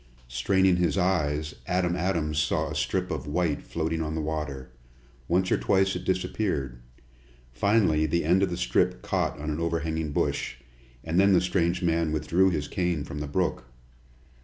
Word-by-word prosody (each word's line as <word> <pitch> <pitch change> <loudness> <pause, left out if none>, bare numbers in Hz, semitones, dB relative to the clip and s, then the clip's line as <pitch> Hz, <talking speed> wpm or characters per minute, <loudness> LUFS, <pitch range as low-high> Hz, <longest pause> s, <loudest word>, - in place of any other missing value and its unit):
Straining 95 +9 +2
his 90 0 +1
eyes, 75 -5 0
Adam 90 -2 +1
Adams 85 -4 0
saw 75 - 0
a - - -5
strip - - -1
of - - -4
white 80 -1 0
floating 80 0 -2
on 80 0 -3
the - - -1
water. 75 -4 -4 0.6
Once 90 +2 +1
or - - +3
twice 95 0 +2
it - - -5
disappeared. 90 - -1 0.7
Finally 95 - +2
the 85 +1 0
end 90 +4 +4
of 100 - +2
the 85 - -3
strip 90 - +1
caught - - -1
on 75 +1 -3
an 75 - -3
overhanging 80 -2 -1
bush, 70 - -1 0.5
and 80 +2 0
then 100 0 +5
the 90 - +6
strange 90 -1 0
man 85 -2 +1
withdrew 85 +5 +2
his 75 -5 -2
cane 90 -5 -1
from 75 0 -6
the 75 - -4
brook. 90 -4 -1
85 Hz, 170 wpm, -27 LUFS, 75-90 Hz, 0.7 s, the